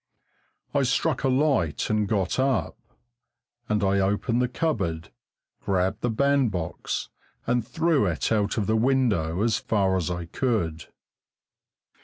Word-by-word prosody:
I 140 - +2
struck 135 +3 0
a - - +3
light 130 - +1
and 105 -1 +1
got 100 0 0
up, 130 -3 +1 0.9
and 105 -1 +1
I 100 0 +2
opened 105 +5 +1
the 125 - +2
cupboard, 100 - -2 0.5
grabbed 95 +2 0
the 120 - 0
bandbox 115 -9 0 0.4
and 120 0 +1
threw 160 - +2
it 85 +3 -1
out 105 -1 +1
of 105 - +1
the 110 - +1
window, 110 -8 +1
as 115 -1 +1
far 95 -3 +1
as 90 -4 -1
I 85 -1 -3
could. 85 -6 -1
110 Hz, 135 wpm, -25 LUFS, 95-130 Hz, 0.9 s, a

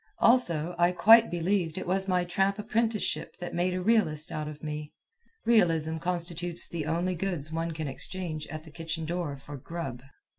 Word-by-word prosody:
Also, 175 -9 +3
I 175 +1 +4
quite 225 +5 +7
believe 175 -1 0
it - - -3
was 190 +2 0
my 180 -1 +2
tramp 195 +3 +1
apprenticeship 220 +1 -1
that 175 -1 -6
made 180 +1 0
a 185 - -2
realist 175 -8 +2
out 155 -2 -3
of 150 0 -9
me. 150 -1 -5 0.5
Realism 165 -8 +3
constitutes 175 0 -1
the 160 -3 -4
only 170 +3 0
goods 170 -4 -2
one 165 +1 -1
can 160 -2 -4
exchange 155 +2 -4
at 155 +1 -7
the 160 - -13
kitchen 165 +2 -4
door 165 -4 -3
for 140 +1 -9
grub. 135 -4 -6
170 Hz, 175 wpm, -29 LUFS, 155-185 Hz, 0.5 s, quite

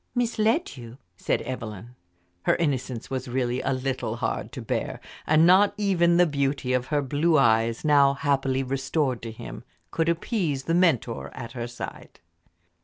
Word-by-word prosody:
"Misled 235 - 0
you?" 120 0 -10 0.2
said - - -1
Evelyn. 115 -2 -7 0.5
Her - - +4
innocence 130 -7 -2
was 130 0 -3
really 125 0 -1
a 135 - -1
little 130 0 -2
hard - - -3
to - - -6
bear, - - -3 0.3
and 155 +1 +5
not 195 +3 +5
even 175 -4 +3
the 175 - +6
beauty 140 -4 -1
of 125 0 0
her 145 -1 0
blue 155 +5 +2
eyes, 115 -1 +2
now 140 -2 +5
happily 135 -2 0
restored 135 0 -1
to 115 - -6
him, 110 - -9 0.3
could 165 0 0
appease 170 - -1
the 165 - -1
mentor 165 -10 +1
at 115 - -7
her 120 -2 -5
side. 120 0 -9
135 Hz, 160 wpm, -25 LUFS, 125-165 Hz, 0.5 s, the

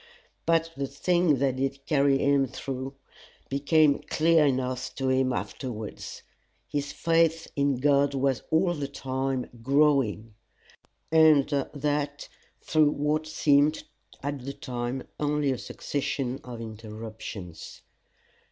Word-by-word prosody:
But 165 0 +2
the 140 0 -2
thing 170 +2 +2
that 130 -1 0
did 135 +1 -2
carry 140 -2 +3
him 140 0 +3
through 135 +2 -5 0.5
became 145 +1 +3
plain 165 +1 +4 0.2
enough 130 0 -3
to 135 -1 -1
him 130 0 +2
afterwards: 115 -5 -5 0.4
his 145 -1 -3
faith 165 0 +2
in 140 -1 +2
God 140 +1 +3
was 135 -2 +1
all 175 +2 +3
the 145 -4 -3
time 130 -1 -2
growing 135 -5 +2 0.8
and 160 -3 +6 0.3
that 145 0 -2 0.3
through 155 -2 +3
what 150 +2 0
seemed 150 0 +3 0.4
at 140 -2 -3
the 140 +2 -5
time 125 0 -4 0.2
only 150 -1 +1
a 130 - -2
succession 135 -2 -3
of 120 -2 -8
interruptions. 110 -4 -8
140 Hz, 115 wpm, -27 LUFS, 130-150 Hz, 0.8 s, and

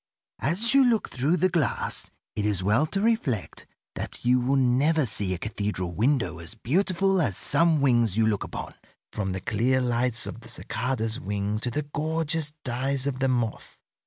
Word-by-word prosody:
As 195 - +1
you 275 0 +7
look 235 -4 +2
through 140 +7 +1
the 185 - +3
glass 170 -8 -1 0.3
it 105 - -1
is 100 -3 0
well 105 +11 +3
to 195 - -2
reflect 155 - -1 0.3
that - - -6
you 125 +1 +4
will 130 +3 +1
never 135 +4 +3
see 100 -4 -2
a 90 - -1
cathedral 100 -2 -3
window 100 - 0
as 85 +6 -7
beautiful 185 - +1
as 100 - 0
some 165 -3 +3
wings 120 -6 +3
you 110 - +4
look 105 -2 0
upon, - - -7 0.4
from 95 -3 -2
the 95 0 -4
clear 120 +7 +1
lights 120 -1 +1
of - - -6
the 115 - -9
cicada's 115 -1 -2
wing 100 +1 -2
to 125 - -2
the 150 +5 -2
gorgeous 160 0 -1
dyes 130 +2 -1
of 135 -2 -2
the 135 - +2
moth. 120 -3 -2
125 Hz, 180 wpm, -26 LUFS, 110-155 Hz, 0.4 s, you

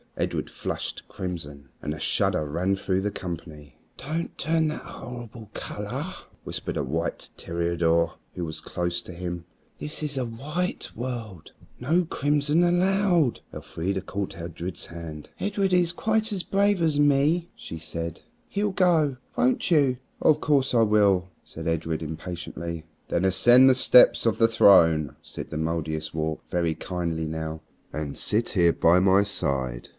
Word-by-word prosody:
Edred - - -2
flushed - - -5
crimson, 75 -8 -6
and 75 - -3
a 80 - -8
shudder 75 - +1
ran 90 +6 0
through 95 -1 -1
the 105 +1 -1
company. 80 -7 -8 0.2
"Don't 160 +5 -4
turn 160 0 +1
that 155 - -3
horrible 120 -3 -9
color," - - -5 0.4
whispered - - -4
a - - 0
white 80 +5 -3
toreador 85 -1 0 0.2
who 90 - -4
was 80 -1 -5
close 85 0 -2
to 90 - -9
him. 85 -1 -5 0.3
"This 150 +1 -4
is 145 -2 -1
the 130 -2 0
white 150 +10 -3
world. 115 -8 -6 0.3
No 160 +8 +2
crimson 150 +1 +1
allowed." 175 - +2
Elfrida 95 +3 -3
caught 95 +1 -4
Edred's 85 +1 -6
hand. 80 -3 -8
"Edred 200 -1 0
is 175 -2 +4
quite 220 +4 0
as 185 -3 -2
brave 200 -1 +2
as 155 -3 +2
me," 145 +4 +3
she 80 - -8
said. 85 0 -5 0.3
"He'll 205 -1 -1
go. 165 -8 +3 0.2
Won't 250 -6 +2
you?" 140 -6 +4 0.2
"Of 150 -1 +4
course 140 -3 +2
I 115 - +5
will," 100 -4 +3
said 80 +1 -8
Edred 80 -1 -1
impatiently. 85 0 -6 0.2
"Then 85 - 0
ascend 120 +8 +6
the 130 - +5
steps 125 -1 +6
of 115 - +1
the 115 - +6
throne," 85 -9 +5
said - - -8
the 75 - -3
Mouldiestwarp, 80 -1 -2
very 85 -2 0
kindly 85 -2 -3
now, 80 0 -4 0.3
"and 75 -2 -4
sit 110 +3 +1
here 85 -4 +3
by 85 +2 +4
my 95 +1 +5
side." 65 -11 -2
95 Hz, 150 wpm, -26 LUFS, -, 0.4 s, ascend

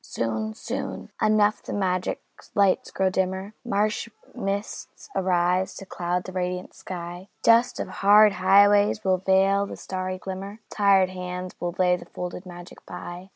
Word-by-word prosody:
Soon, 110 -1 -3
soon - - -5
enough 215 -1 +3
the - - -8
magic 185 -2 -1 0.3
lights 200 -2 +3
grow 190 -1 0
dimmer, 190 +2 -2
Marsh 215 0 0 0.2
mists 200 +2 -5
arise 180 0 +1
to 195 - -9
cloud 180 0 -2
the 185 - -8
radiant 180 0 -3
sky, 175 0 -7 0.2
Dust 230 +2 +4
of - - -2
hard 210 +1 +5
highways 205 +3 +4
will 185 -1 +2
veil 195 +1 +3
the - - -8
starry 185 0 -4
glimmer, 195 +2 -7
Tired 195 -2 +4
hands 180 0 -5
will 175 0 -3
lay 180 -1 +3
the - - -11
folded 180 +1 -7
magic 175 0 -11
by. 180 +2 -8
190 Hz, 150 wpm, -25 LUFS, 180-200 Hz, 0.3 s, hard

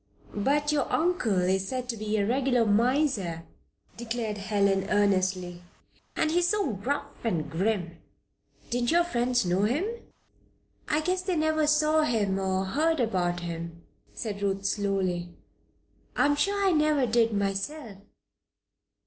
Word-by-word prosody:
"But 290 +8 +1
your 295 -1 0
uncle 310 - +1
is 190 +1 +1
said 255 +2 -3
to 235 - -1
be 215 0 -2
a 200 - +1
regular 250 0 +2
miser," 215 - +1 0.5
declared 225 -2 -3
Helen, 200 -1 +1
earnestly. 185 -3 +1 0.5
"And 310 - +1
he 345 - +3
is 350 - +2
so 410 - 0
gruff 280 +8 -4
and 175 -10 -1
grim! 175 -2 -1 0.7
Didn't 240 0 0
your 345 +1 +4
friends 245 - 0
know 180 +2 +1
him?" 275 - 0 1.0
"I 300 - +1
guess 365 +3 0
they 365 -1 -1
never 310 -1 +1
saw 305 +1 +3
him, 210 -9 0
or 190 0 0
heard 315 +11 +1
much 240 -4 +1
about 175 -3 -1
him," 170 0 -6 0.3
said 205 -3 -5
Ruth, 195 0 -1
slowly. 190 -4 -1 0.8
"I'm 290 0 +3
sure 400 +7 0
I - - +4
never 305 -4 +2
did 230 0 +2
myself." 200 +3 -3
225 Hz, 140 wpm, -27 LUFS, 195-295 Hz, 1.0 s, your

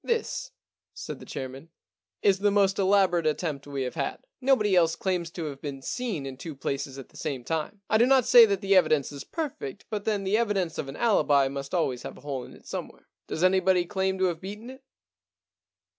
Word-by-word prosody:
This,* 465 -1 -1 0.5
said - - -6
the - - -12
chairman, 135 +4 -7 0.3
* 90 0 -64
is 195 -1 +4
the 205 +1 +3
most 200 -1 +2
elaborate 190 -4 +3
attempt 150 -2 -2
we 140 -2 -3
have 125 - -4
had. 140 -4 -2 0.2
Nobody 250 -7 +3
else 165 -2 +4
claims 180 -3 -1
to 165 -1 -5
have 140 -2 -6
been 135 -2 -6
seen 220 - -3
in 135 -1 -6
two 160 +1 -7
places 135 0 -3
at 135 - -9
the - - -16
same 135 -5 -4
time. 165 - -3
I 220 - +3
do 240 - +5
not 265 -2 +5
say 235 -2 +9
that 200 -1 -1
the 195 -1 +3
evidence 155 -7 +3
is 140 -1 -7
perfect, 290 - -5
but 210 -2 -3
then 210 -2 0
the 200 +3 +2
evidence 195 -7 0
of 135 - -3
an 135 - -7
alibi 145 - +3
must 140 +3 -5
always 130 -8 0
have - - -8
a - - -14
hole 140 -3 -4
in - - -12
it - - -19
somewhere. - - -7 0.2
Does 160 - -3
anybody 185 -1 +4
claim 190 +1 -1
to 190 - +2
have 170 -3 -1
beaten 210 +6 -7
it 265 +1 -14
175 Hz, 220 wpm, -27 LUFS, 140-200 Hz, 0.5 s, say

